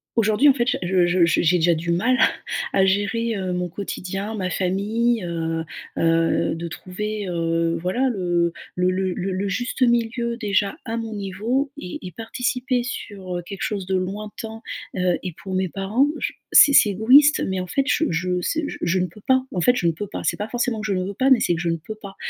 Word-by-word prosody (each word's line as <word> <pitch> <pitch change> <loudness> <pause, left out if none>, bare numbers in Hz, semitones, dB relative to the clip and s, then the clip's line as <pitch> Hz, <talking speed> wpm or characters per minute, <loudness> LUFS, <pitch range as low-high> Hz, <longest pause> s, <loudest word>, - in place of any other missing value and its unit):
aujourd'hui, 225 +5 +4
en - - +6
fait, 240 -2 +1
ja - - 0
je 180 0 +3
je 175 0 +3 0.2
j'ai 175 +1 +3
déjà 170 0 +3
du 170 +2 -2
mal 240 +10 +2
à - - +6 0.5
à 190 - +5
gérer, 205 +4 0
heu, 185 -1 -2
mon 180 0 -2
quotidien, 195 +3 -5
ma 185 -3 -2
famille, 210 +5 0
heu 165 -1 -2 0.4
heu, 165 0 +2
de 170 +1 -5
trouver, 205 +4 -5
heu, 165 -1 0
voilà, 245 +9 +1
le 175 -5 0 0.2
le 180 0 +2
le 185 0 -1
le 190 +2 -3
le 195 +2 -2
juste 245 +6 -3
milieu, 235 0 +1
déjà, 205 +2 0
à 225 -1 -3
mon 225 -1 -4
niveau 215 +8 -2
et 180 - -6
et 180 - -8
participer 245 - -2
sur, 195 -6 -5
heu, 175 - -5
quelque 195 +2 -8
chose 200 -3 -2
de 190 - -3
lointain, 210 +4 -5 0.4
heu, 180 -1 +2
et 180 -3 -4
pour 190 - -5
mes 185 -1 0
parents. 205 - +1
J - - -2 0.2
c'est 285 - +9
c'est 210 - +7
égoïste, 260 +9 +5
mais 190 -1 -2
en 180 - -3
fait, 275 +10 +1
je 320 - +2
je 180 +2 0
c 320 - -1
je - - -6
je 175 +2 +1
ne 180 - 0
peux 200 +5 -16
pas, 260 0 +4
en 180 - -1
fait, 245 - +4
je 175 -8 0
ne - - +4
peux 205 +6 -5
pas. - - -6
C'est - - 0
pas 210 - -3
forcément 240 -3 -1
que - - -5
je 200 - 0
ne 185 - -1
veux 200 - -5
pas, 265 +1 +2
mais 250 - +7
c'est 175 - +1
que - - -4
je 170 - -1
ne 165 - 0
peux 215 +7 -8
pas 200 -3 -11
195 Hz, 230 wpm, -22 LUFS, 180-230 Hz, 0.5 s, c'est